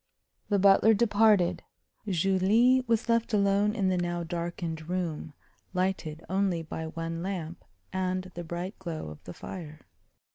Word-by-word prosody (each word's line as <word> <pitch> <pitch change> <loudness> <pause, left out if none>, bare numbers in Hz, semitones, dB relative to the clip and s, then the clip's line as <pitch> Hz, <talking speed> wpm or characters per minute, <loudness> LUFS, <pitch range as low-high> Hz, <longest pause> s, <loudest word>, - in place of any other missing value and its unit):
The 205 - +3
butler 200 +3 +6
departed. 205 -5 +3 0.5
Julie 195 +8 +3
was 230 +1 +1
left 230 -1 +2
alone 200 +1 +2
in 195 -4 +1
the 185 - +1
now 175 0 -2
darkened 170 -1 -4
room, 170 -4 -3 0.4
lighted 180 -4 -2
only 190 -2 0
by 160 0 -5
one 165 +1 -4
lamp 175 -3 -5 0.3
and 185 0 -2
the 175 - -6
bright 175 +4 -5
glow 165 - -5
of 75 - -11
the 90 - -7
fire. 155 -4 -8
185 Hz, 140 wpm, -29 LUFS, 165-200 Hz, 0.5 s, butler